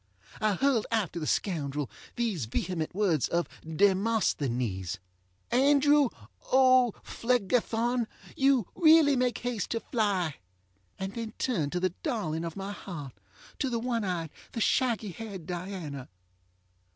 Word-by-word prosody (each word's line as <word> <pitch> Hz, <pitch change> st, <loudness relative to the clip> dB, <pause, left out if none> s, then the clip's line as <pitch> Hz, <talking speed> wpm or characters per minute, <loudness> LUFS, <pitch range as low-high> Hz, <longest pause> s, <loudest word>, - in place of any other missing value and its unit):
I 215 Hz, -2 st, +2 dB
hurled 260 Hz, -2 st, +2 dB
after 205 Hz, -7 st, 0 dB
the 155 Hz, -, -3 dB
scoundrel 145 Hz, -7 st, -1 dB, 0.3 s
these 220 Hz, -, -1 dB
vehement 165 Hz, +8 st, -3 dB
words 185 Hz, -9 st, +2 dB
of 170 Hz, 0 st, 0 dB, 0.2 s
DemosthenesŌĆö 150 Hz, -, +1 dB, 0.5 s
Andrew 285 Hz, +1 st, +5 dB, 0.4 s
OŌĆÖPhlegethon, 245 Hz, -2 st, +2 dB, 0.3 s
you 270 Hz, -5 st, +3 dB
really 315 Hz, -4 st, +6 dB
make 250 Hz, -1 st, +1 dB
haste 245 Hz, -5 st, -3 dB
to 230 Hz, -, -1 dB
fly, 195 Hz, -, 0 dB, 0.6 s
and 190 Hz, +1 st, -4 dB
then 225 Hz, -1 st, -5 dB
turned 170 Hz, -, 0 dB
to 180 Hz, -, 0 dB
the 185 Hz, -1 st, 0 dB
darling 170 Hz, -, -2 dB
of 165 Hz, -, -5 dB
my 195 Hz, +1 st, -5 dB
heart, 160 Hz, -10 st, -7 dB, 0.5 s
to 270 Hz, -, 0 dB
the 235 Hz, -, -1 dB
one 230 Hz, -1 st, -1 dB
eyed! 170 Hz, -5 st, -2 dB, 0.2 s
the -, -, -3 dB
shaggy 225 Hz, -3 st, +1 dB
haired 195 Hz, -2 st, -7 dB
Diana. 175 Hz, -6 st, -5 dB
205 Hz, 125 wpm, -29 LUFS, 165-245 Hz, 0.6 s, really